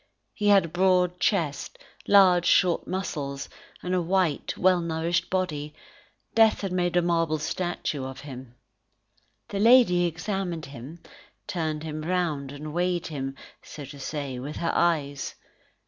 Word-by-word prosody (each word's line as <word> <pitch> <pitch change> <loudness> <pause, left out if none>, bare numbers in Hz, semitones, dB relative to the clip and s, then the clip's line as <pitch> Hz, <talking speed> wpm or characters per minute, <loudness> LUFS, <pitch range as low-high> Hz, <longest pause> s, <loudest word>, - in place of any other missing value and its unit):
He 210 - -2
had 200 -3 +6
a - - -5
broad 180 +1 +2
chest, 160 -9 -1 0.3
large 185 -3 +6
short 180 -3 +3
muscles, 145 -7 -4 0.4
and 180 - -2
a 180 - +2
white, 175 -3 0
well 185 -1 +4
nourished 165 +1 -1
body; 150 -6 -2 0.6
death 225 -1 +4
had 195 -2 -3
made 175 -1 0
a 175 - +3
marble 165 -2 +1
statue 155 -2 -3
of 130 0 -8
him. 130 -3 -10 0.9
The 200 - -3
lady 225 -6 +6
examined 175 -1 -3
him, 140 +5 -10 0.4
turned 160 -6 -3
him 155 -1 -5
round 155 -5 -1
and 150 +1 -7
weighed 175 0 0
him, 135 -3 -4 0.3
so 145 - -9
to 140 +1 -11
say, 135 -2 -4
with 145 +4 -6
her 170 - -1
eyes. 145 -5 0
170 Hz, 145 wpm, -26 LUFS, 150-180 Hz, 0.9 s, had